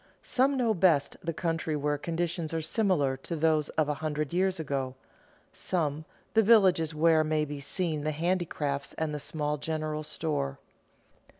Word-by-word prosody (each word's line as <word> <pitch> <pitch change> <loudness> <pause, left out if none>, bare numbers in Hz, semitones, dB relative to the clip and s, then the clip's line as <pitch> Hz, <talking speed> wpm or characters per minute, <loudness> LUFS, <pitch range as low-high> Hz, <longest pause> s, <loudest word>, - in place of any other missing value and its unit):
Some 270 +2 +2
know 235 -3 +2
best 165 -7 +3
the 165 - -1
country 165 -1 -2
where 145 0 0
conditions 170 0 -2
are - - +1
similar 160 - +1
to 165 +5 -5
those 155 -1 +2
of 155 -2 +3
a 150 - +1
hundred 155 0 -2
years 185 0 +1
ago; 135 -4 -2 0.6
some, 155 -3 -1 0.3
the 225 - +6
villages 190 -8 +4
where 160 0 +4
may 155 0 +1
be 145 -1 -6
seen 155 +1 -2
the 155 - 0
handicrafts 155 -4 -1
and 160 -1 -2
the 150 - -3
small 150 0 -2
general 155 0 -3
store. 150 - -2
155 Hz, 160 wpm, -29 LUFS, 150-170 Hz, 0.6 s, the